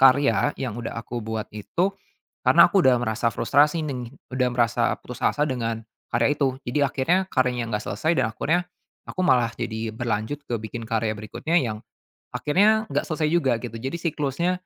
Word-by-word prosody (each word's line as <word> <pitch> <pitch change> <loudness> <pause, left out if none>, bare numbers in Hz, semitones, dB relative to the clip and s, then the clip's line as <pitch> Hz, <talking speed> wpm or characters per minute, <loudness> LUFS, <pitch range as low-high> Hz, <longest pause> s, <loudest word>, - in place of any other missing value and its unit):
karya 135 -2 +5
yang 130 -4 -3
udah 115 - -5
aku 115 +1 -5
buat 110 0 -3
itu, 170 - -1 0.5
karena - - +6
aku 200 - +5
udah 130 -5 +5
merasa 110 0 0
frustrasi 150 +3 +3
neng 125 -5 -4 0.2
udah 125 -1 +2
merasa 120 -2 +1
putus - - -8
asa 150 - +1
dengan 115 -5 -2 0.3
karya 145 - +2
itu. 135 -3 +2
Jadi 125 +5 -1
akhirnya 150 +8 +1
karyanya 125 -2 +1
nggak 105 - -6
selesai 160 +2 0
dan 110 - +1
akhirnya 165 +10 +1 0.4
aku 185 - -6
malah 120 -7 +4
jadi 115 -1 -4
berlanjut 115 +4 -2
ke 120 - -1
bikin 115 +1 -6
karya 115 -1 0
berikutnya 160 +10 -2
yang 110 -5 -3 0.5
akhirnya 210 +8 +3
nggak - - 0
selesai 155 -2 0
juga 135 -8 +3
gitu. 115 -2 -5
Jadi 135 +7 -3
siklusnya 155 +1 0
125 Hz, 170 wpm, -24 LUFS, 115-150 Hz, 0.5 s, karena